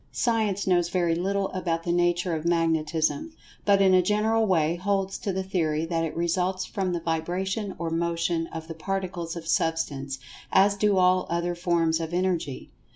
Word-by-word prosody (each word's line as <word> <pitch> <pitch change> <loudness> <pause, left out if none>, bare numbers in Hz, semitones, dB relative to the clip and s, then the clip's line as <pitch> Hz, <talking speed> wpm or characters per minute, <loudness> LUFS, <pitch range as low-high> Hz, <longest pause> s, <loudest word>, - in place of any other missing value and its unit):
Science 215 -4 0
knows 175 -2 +2
very 175 -2 +1
little 195 +3 0
about 170 -3 -2
the 170 - -1
nature 175 0 +1
of 155 -1 -2
Magnetism, 165 - 0 0.3
but 200 -1 +5
in 190 -1 +5
a 185 - +6
general 215 +3 +2
way 165 -3 +2
holds 195 +1 -1
to 200 - -2
the 190 0 -2
theory 160 -5 0
that 165 -1 -1
it 165 - -4
results 180 +2 0
from 190 -2 -2
the 175 - -1
vibration 180 +5 -2
or 165 -1 -3
motion 165 0 0
of 160 -1 -7
the 165 - -5
Particles 175 -1 -4
of 165 -1 -7
Substance, 160 -6 -1 0.3
as 200 +1 +5
do 200 -1 +2
all 185 0 +3
other 170 +1 -1
forms 170 -2 +1
of 165 +1 -3
Energy. 175 -7 -2
175 Hz, 175 wpm, -26 LUFS, 165-190 Hz, 0.3 s, a